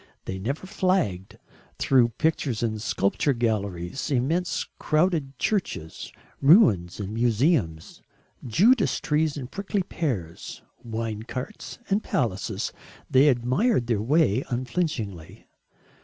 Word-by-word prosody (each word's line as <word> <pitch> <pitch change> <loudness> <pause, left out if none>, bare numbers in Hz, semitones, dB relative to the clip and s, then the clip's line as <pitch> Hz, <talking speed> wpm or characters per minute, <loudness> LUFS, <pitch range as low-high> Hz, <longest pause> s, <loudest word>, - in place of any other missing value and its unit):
They 95 0 -4
never 135 - -3
flagged 155 - -1 0.4
through 125 -3 +4
pictures 140 -7 0
and 110 -2 -2
sculpture 120 +10 +1
galleries, 105 - -2
immense 150 +7 0
crowded 155 -4 +1
churches, 170 - -2 0.3
ruins 135 - +5
and 100 0 -4
museums, 115 - 0 0.4
Judas 200 - +3
trees 150 0 0
and 130 -3 -7
prickly 200 -1 -2
pears, 110 - -4 0.2
wine 110 -2 -4
carts 125 - -7
and 200 +2 +1
palaces, 110 -7 -2 0.4
they 135 +3 +6
admired 130 - +2
their 115 -4 0
way 135 -1 +2
unflinchingly. 120 - -3
125 Hz, 105 wpm, -25 LUFS, 105-160 Hz, 0.4 s, they